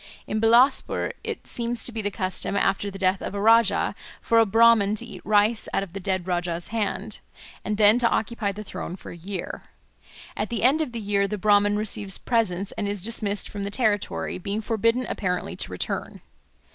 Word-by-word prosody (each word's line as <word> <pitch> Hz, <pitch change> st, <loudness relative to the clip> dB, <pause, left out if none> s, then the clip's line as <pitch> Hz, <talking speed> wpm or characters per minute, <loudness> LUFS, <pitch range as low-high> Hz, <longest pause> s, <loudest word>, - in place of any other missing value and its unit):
In 215 Hz, -, -2 dB
Bilaspur 240 Hz, +4 st, +4 dB
it -, -, -5 dB
seems 235 Hz, 0 st, -2 dB
to -, -, -4 dB
be 225 Hz, -1 st, -4 dB
the 205 Hz, -, -1 dB
custom, 190 Hz, 0 st, -3 dB
after 200 Hz, 0 st, +1 dB
the 195 Hz, -, -8 dB
death 190 Hz, 0 st, +1 dB
of -, -, -5 dB
a -, -, -2 dB
Rajah, 225 Hz, 0 st, +4 dB, 0.3 s
for 230 Hz, -, +3 dB
a 225 Hz, -, +4 dB
Brahman 225 Hz, -1 st, +5 dB
to 235 Hz, -, -6 dB
eat 200 Hz, -6 st, -10 dB
rice 215 Hz, +2 st, +2 dB
out -, -, +1 dB
of 185 Hz, -3 st, -10 dB
the 195 Hz, -, -5 dB
dead 185 Hz, -1 st, -2 dB
Rajah's 175 Hz, -1 st, -2 dB
hand, 220 Hz, -3 st, -3 dB, 0.4 s
and 210 Hz, -1 st, -2 dB
then 210 Hz, +2 st, +5 dB
to 235 Hz, -, +3 dB
occupy 220 Hz, -2 st, -1 dB
the 210 Hz, +2 st, -7 dB
throne 180 Hz, -3 st, -6 dB
for -, -, -11 dB
a -, -, -9 dB
year. 180 Hz, +2 st, -6 dB, 0.7 s
At -, -, -3 dB
the 235 Hz, -3 st, -3 dB
end 275 Hz, +6 st, +4 dB
of 305 Hz, -, -2 dB
the 235 Hz, -, -5 dB
year 200 Hz, -1 st, +1 dB
the 210 Hz, -, -3 dB
Brahman 205 Hz, +1 st, +3 dB
receives 210 Hz, -2 st, -1 dB
presents 205 Hz, -5 st, 0 dB
and 205 Hz, -, -3 dB
is 205 Hz, -3 st, -4 dB
dismissed 210 Hz, -2 st, -2 dB
from 205 Hz, -, -7 dB
the 200 Hz, -, -2 dB
territory, 205 Hz, -4 st, -1 dB
being 200 Hz, +4 st, -3 dB
forbidden 230 Hz, +3 st, +1 dB
apparently 180 Hz, -3 st, -2 dB
to -, -, -3 dB
return. -, -, -4 dB
205 Hz, 200 wpm, -25 LUFS, 195-230 Hz, 0.7 s, Brahman